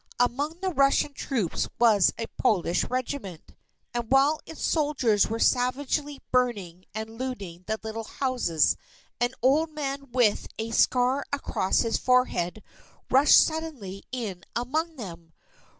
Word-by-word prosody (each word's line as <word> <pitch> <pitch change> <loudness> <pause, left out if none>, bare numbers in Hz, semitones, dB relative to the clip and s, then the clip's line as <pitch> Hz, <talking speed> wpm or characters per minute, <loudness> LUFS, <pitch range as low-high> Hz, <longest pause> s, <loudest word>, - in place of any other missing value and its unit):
Among 285 +8 0
the 375 -1 -1
Russian 275 +1 +3
troops 235 - -2
was 215 -5 +5
a 230 - -3
Polish 175 -4 +2
Regiment. 250 - -5 0.4
And 240 -1 -3
while 280 +3 +4
its 320 - -8
soldiers 265 - +2
were 225 - -3
savagely 275 +4 0
burning 200 -9 0
and 220 +1 -6
looting 195 -9 -6
the 220 0 -2
little 220 0 -5
houses, 245 - +1 0.4
an 245 +2 0
old 300 +5 +3
man 280 -3 -5
with 235 -4 +2
a 225 +1 -4
scar 250 +4 +3
across 275 -9 0
his 230 -1 0
forehead, 220 -7 +1 0.5
rushed 275 +3 +7
suddenly 290 - -2
in 210 -9 -5
among 315 +7 -1
them. 170 - -9
245 Hz, 130 wpm, -26 LUFS, 215-280 Hz, 0.5 s, rushed